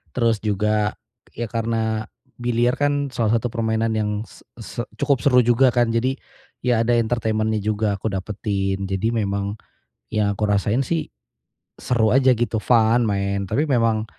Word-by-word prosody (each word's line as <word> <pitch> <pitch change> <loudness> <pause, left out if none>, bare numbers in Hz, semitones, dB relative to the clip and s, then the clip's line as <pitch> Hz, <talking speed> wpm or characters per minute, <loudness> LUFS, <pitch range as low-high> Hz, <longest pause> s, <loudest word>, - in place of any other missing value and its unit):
Terus 115 -3 +2
juga, 105 0 0 0.4
ya 120 0 -3
karena 110 -1 -1 0.3
biliar 120 +1 +1
kan 145 -1 +1
salah 115 -2 +1
satu 115 +1 -3
permainan 110 -1 0
yang 105 -1 0
s - - -17 0.2
se 115 +1 -5 0.2
cukup 140 -3 +2
seru 125 -2 +5
juga 120 +2 +4
kan. 120 -1 +2
Jadi, 125 +4 0 0.5
ya 120 -2 +2
ada 120 0 +3
entertainment-nya 110 -2 0
juga 105 -1 0
aku 110 - -3
dapetin. 95 0 -2
Jadi, 95 +4 -1
memang 100 -1 -1 0.6
yang 105 -1 +1
aku 105 - 0
rasain 105 +5 +1
sih 165 +2 -2 0.7
seru 115 -3 +2
aja 130 -1 +5
gitu, 115 -1 -1
fun, 115 0 +4
main, 100 -1 -1
tapi 150 +3 +1
memang, 115 -5 +1
110 Hz, 150 wpm, -22 LUFS, 105-120 Hz, 0.7 s, seru